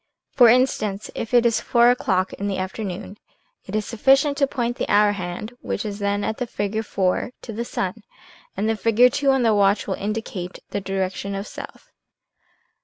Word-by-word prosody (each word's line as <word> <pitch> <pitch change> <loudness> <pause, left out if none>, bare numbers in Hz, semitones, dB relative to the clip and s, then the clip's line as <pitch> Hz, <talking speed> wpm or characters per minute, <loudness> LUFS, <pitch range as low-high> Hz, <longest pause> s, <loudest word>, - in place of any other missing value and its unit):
For 245 -3 +6
instance, 215 -5 +1
if 225 - -5
it 240 -1 +4
is 230 -1 +2
four 240 0 +4
o'clock 190 -6 0
in 200 - -4
the 195 - -2
afternoon, 190 +1 -5 0.5
it 195 - -5
is 215 -1 0
sufficient 270 +6 +3
to 275 -1 +3
point 240 -3 -2
the - - -3
hour 205 0 +5
hand 195 +3 -5
(which - - -3
is 205 -1 -5
then 200 0 0
at 220 - -2
the 250 - -3
figure 205 0 -2
IIII) 195 +3 -1
to 225 - -7
the 230 +3 -3
sun, 205 -2 -3 0.6
and 215 - 0
the 225 - +1
figure 230 +3 +4
II 280 - +3
on 265 -2 +3
the 225 -2 +4
watch 200 0 +3
will 195 - -2
indicate 200 -3 -4
the 200 - -2
direction 195 +1 -3
of 195 +1 -4
south. - - -10
210 Hz, 190 wpm, -23 LUFS, 195-235 Hz, 0.6 s, For